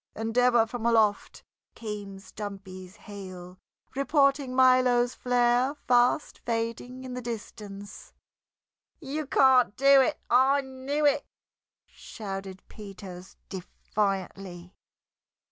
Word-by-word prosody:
And 225 +1 -4
ever 245 -2 +4
from 230 0 -7
aloft 220 -3 +1 0.3
came 205 -3 -7
Stumpy's 195 -2 -9
hail, 185 -3 -10 0.4
reporting 275 -2 +2
Milo's 255 -1 +4
flare 245 +2 +1
fast 245 +1 +1
fading 230 +2 -3
in 255 -1 -7
the 250 - -5
distance. 205 -3 -8 0.9
"You 300 0 -5
can't 260 -6 +4
do 275 0 +6
it! 300 +3 0
I 265 +3 +4
knew 270 +3 -3
it!" 285 - +2 0.6
shouted 195 -3 -8
Peters 195 -3 -11
defiantly. 190 -1 -4
235 Hz, 95 wpm, -27 LUFS, 195-260 Hz, 0.9 s, do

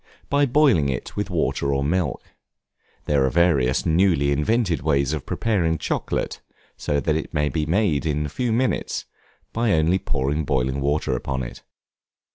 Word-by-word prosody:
By 140 0 +3
boiling 125 - +3
it 65 - -4
with - - -2
water 70 - 0
or 70 0 0
milk. 80 -2 -1 0.8
There 70 -2 +2
are 65 - +2
various 75 -6 +2
newly 80 -4 +3
invented 90 - +1
ways 70 -2 +1
of 75 -4 -5
preparing 90 -8 0
chocolate, - - -3 0.3
so 75 -1 -1
that 75 +2 0
it 80 +1 -4
may 75 0 +1
be 75 -1 -2
made 80 -5 +1
in 75 0 0
a - - -4
few 120 - -2
minutes, 125 +3 -1 0.5
by 115 -2 +1
only 80 +4 +2
pouring 70 +2 -1
boiling 65 -1 -1
water 70 -2 0
upon 65 +1 -3
it. - - -8
75 Hz, 160 wpm, -23 LUFS, 70-90 Hz, 0.8 s, By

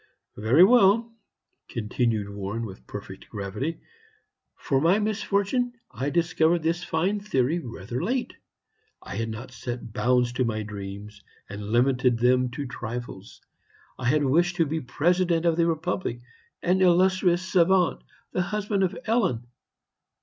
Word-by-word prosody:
"Very 115 - +5
well," 230 +1 +5 0.5
continued 110 -1 -1
Warren, 100 +3 -4
with 95 - -11
perfect - - -9
gravity; 105 +11 -4 0.7
"for 135 -1 0
my 170 +6 +4
misfortune, 215 +3 0 0.2
I 135 +2 -2
discovered 165 0 +2
this 170 +2 0
fine 185 +6 0
theory 160 -5 0
rather 120 - -5
late. 245 +6 -1 0.7
I - - -6
had 115 0 -2
not 120 +4 -7
set 120 -3 -6
bounds 125 0 +2
to 130 - 0
my 110 -2 -1
dreams 100 0 -8 0.3
and 100 +1 -7
limited 125 +1 +3
them 125 +1 +3
to 140 +4 -5
trifles. 120 -4 -7 0.6
I 130 - -4
had 145 +4 +3
wished 170 +6 +2
to 165 -2 +2
be 160 +2 -2
President 170 +6 +1
of 165 -1 +3
the 170 0 +2
Republic, 160 -6 -2 0.4
an 185 +2 +2
illustrious 185 0 +3
savant, 185 -1 +3 0.3
the 185 - 0
husband 210 +2 -1
of 185 - -1
Ellen. 185 - +1
145 Hz, 135 wpm, -26 LUFS, 120-180 Hz, 0.7 s, Very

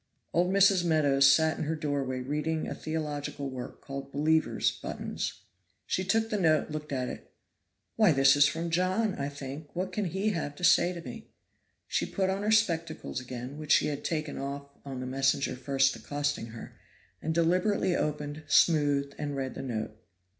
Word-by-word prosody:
Old 180 +2 +2
Mrs. 195 -2 +5
Meadows 140 -5 +5
sat 160 +2 +3
in - - -1
her 160 +2 -1
doorway 140 -4 -2
reading 150 +4 -2
a - - -3
theological 145 -3 -4
work 125 -1 -7
called 140 0 -7
"Believers' 155 +3 +2
Buttons." - - -5 0.4
She 185 - -1
took 225 +4 +1
the 210 - 0
note, 155 -4 +2
looked 150 0 -5
at 130 -2 -1
it. - - -8 0.7
"Why, 215 -5 +6
this 135 -1 +5
is 145 0 +6
from 165 +2 -3
John, 185 +5 +1
I 140 -3 -3
think; 140 +2 -8
what 185 +2 -2
can 210 +1 -1
he 190 +4 0
have 160 -7 -3
to 180 - -11
say 175 +1 +5
to 170 -2 -7
me?" - - -9 0.6
She - - 0
put 190 -2 0
on 195 +1 -2
her 210 - 0
spectacles 165 -10 +1
again, 125 +3 -7
which 155 0 +2
she - - +4
had 145 -1 -4
taken 155 -2 -2
off 140 +1 -5
on 135 -2 -6
the - - -4
messenger 135 +1 +1
first 135 +1 +1
accosting 145 -4 -2
her, 115 0 -11 0.4
and 160 - -2
deliberately 180 +3 +2
opened, 150 0 -2
smoothed 145 -3 +3
and 145 -1 -3
read 135 -1 -3
the - - -6
note. 110 -5 -3
150 Hz, 180 wpm, -29 LUFS, 140-170 Hz, 0.7 s, Why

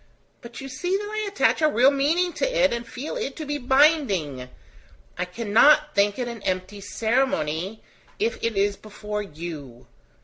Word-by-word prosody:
But 235 -1 -10
you 270 - -7
see 355 +9 -1
that 410 - -5
I 430 0 -3
attach 400 -4 +1
a 310 - +5
real 260 +1 +5
meaning 325 +6 +1
to - - -1
it, - - +3
and 235 0 -4
feel 265 +5 -6
it 270 - -4
to 310 - -6
be 290 0 -3
binding: 245 - +2 0.7
I 180 - -2
cannot 235 +10 +4
think 200 0 +2
it 250 -2 -2
an 235 -3 -7
empty 185 +2 -3
ceremony, 220 - -1 0.3
if 460 +4 -2
it 230 -3 -1
is 200 +1 +2
before 210 0 -6
you. 150 - -8
235 Hz, 170 wpm, -24 LUFS, 195-295 Hz, 0.7 s, a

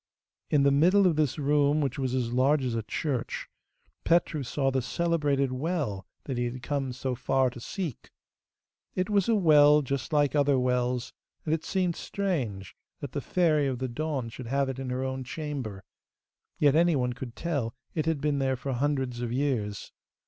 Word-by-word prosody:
In 145 -2 +3
the 140 - +5
middle 180 +8 +5
of 175 -4 +3
this 150 -4 +1
room, 145 0 +2
which 140 -2 -1
was 130 -1 -1
as 120 -2 -1
large 135 +3 +3
as 125 - -1
a 115 - -1
church, 125 +4 -3 0.6
Petru 165 -3 +2
saw 135 +1 0
the 130 0 0
celebrated 145 -2 0
well 130 - -2 0.2
that 130 -4 -3
he 120 - +1
had 120 +1 -5
come 140 -2 -2
so 130 +1 -3
far 130 +1 +1
to 120 - -10
seek. 160 - -5 0.9
It 185 +3 -1
was 200 0 +2
a 230 - +4
well 150 -5 +6
just 140 +1 -3
like 145 -2 +3
other 145 -2 +3
wells, 125 -1 0 0.3
and 155 - +1
it 160 - -1
seemed 185 -3 0
strange 130 - -3 0.2
that - - -6
the - - -3
Fairy 155 -5 +2
of 130 -2 -2
the 130 +1 -2
Dawn 135 -1 -3
should 115 +1 -8
have 135 +2 +1
it 130 0 -4
in 135 -1 -4
her 125 +1 -2
own 130 0 -3
chamber; 130 -8 -5 0.7
yet 145 -1 +4
anyone 150 -7 +3
could 125 -2 -8
tell 140 -9 -2 0.2
it 155 -1 -1
had 160 -4 0
been 145 -1 +1
there 135 -1 +1
for 130 +2 -4
hundreds 130 -2 -1
of 120 -1 -2
years. 120 -6 -2
135 Hz, 185 wpm, -28 LUFS, 125-150 Hz, 0.9 s, well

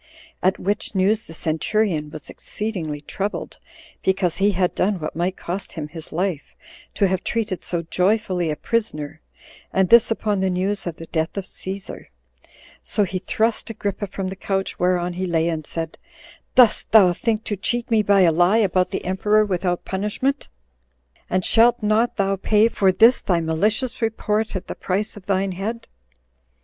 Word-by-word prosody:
At 185 +1 +2
which 205 +1 -2
news 200 +3 +2
the 165 - -13
centurion 160 0 0
was 150 -1 -9
exceedingly 170 -9 -5
troubled, 200 +7 -4 0.4
because 190 -3 +1
he 200 +2 +3
had 180 -1 +1
done 200 +2 +1
what 155 - -5
might 175 +3 -1
cost 185 +3 -5
him 150 -4 -5
his 160 0 -9
life, 175 -3 -3 0.4
to 200 - +3
have 185 -1 -1
treated 215 -6 -2
so 170 -1 -2
joyfully 185 0 +1
a 150 - -1
prisoner, 160 -8 -2 0.5
and 190 -1 +2
this 235 0 +7
upon 215 -3 0
the 190 0 +1
news 190 +2 -1
of 170 - -3
the 165 - -9
death 160 +2 -2
of 195 - -3
Cæsar; 190 +1 -7 0.7
so 210 - 0
he 185 -1 -2
thrust 220 +5 0
Agrippa 205 -2 -3
from 190 0 -4
the 190 - -6
couch 195 0 -3
whereon 180 0 +1
he 185 +1 -3
lay, 165 -1 +1
and 160 -3 -3
said, 165 -1 -5 0.6
"Dost 250 -4 +5
thou 195 -5 +7
think 220 +3 -1
to 210 - -3
cheat 235 +5 -1
me 220 -1 +4
by 200 -1 +4
a 175 -3 +5
lie 175 +6 +4
about 185 -4 +2
the - - -4
emperor 210 +3 +2
without 180 -2 -1
punishment? 210 +8 -2 0.8
and 185 0 0
shalt 235 0 +4
not 215 +3 +2
thou 195 -1 +1
pay 210 +3 +3
for 195 -4 +3
this 230 +6 +5
thy 175 -3 +1
malicious 210 +11 -1
report 220 -1 -1
at 185 - -3
the - - -5
price 200 +3 -2
of 195 -3 -13
thine 195 0 +1
head?" 215 +6 -5
190 Hz, 175 wpm, -22 LUFS, 175-215 Hz, 0.8 s, this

